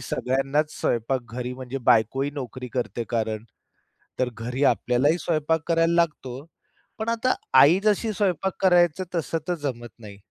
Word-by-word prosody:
सगळ्यांनाच 135 +4 -1
स्वयंपाक 120 +3 0
घरी 125 +1 -4
म्हणजे 130 +1 -6
बायको 115 +4 +4
ही 140 - -1
नोकरी 130 -2 -6
करते 120 -2 -2
कारण 110 -2 -2 0.8
तर 130 -1 +1
घरी 125 +4 -3
आपल्यालाही 140 +6 +2
स्वयंपाक 160 -1 0
करायला 165 0 +2
लागतो. 150 -5 -1 0.5
पण 220 +1 -3
आता 230 +2 +1 0.3
आई 160 +8 +7
जशी 215 +1 +2
स्वयंपाक 190 -2 0
करायचं, 175 -2 +4
तसं 165 0 -1
तर 180 - 0
जमत 120 -4 -4
नाही. 105 -3 -11
135 Hz, 145 wpm, -24 LUFS, 125-170 Hz, 0.8 s, आई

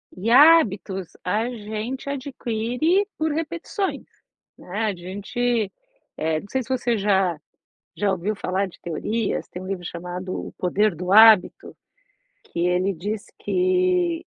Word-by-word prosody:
E 195 +5 -3
hábitos 230 - +5 0.2
a 215 +6 0
gente 220 +3 -5
adquire 275 - -1
por 315 -1 0
repetições, 340 +5 -3 0.5
né. 205 +5 -4
A 210 - 0
gente 205 +5 -2 0.5
eh, 155 0 0
não - - -13
sei 265 +5 -1
se 240 - -11
você 245 -2 0
já 195 -5 +1 0.6
já 205 -1 +1
ouviu 190 +3 -2
falar 195 0 -1
de 180 - -16
teorias? 210 +7 -2
Tem 180 - -8
um - - -8
livro 190 -2 -4
chamado: 180 +2 -6 0.2
O - - -18
Poder 200 +2 +2
do 180 +3 -4
Hábito, 220 -2 +6 0.8
que 170 - -3
ele 180 +2 +1
diz 200 +5 -4
que 365 -2 +1
215 Hz, 140 wpm, -23 LUFS, 185-260 Hz, 0.8 s, Hábito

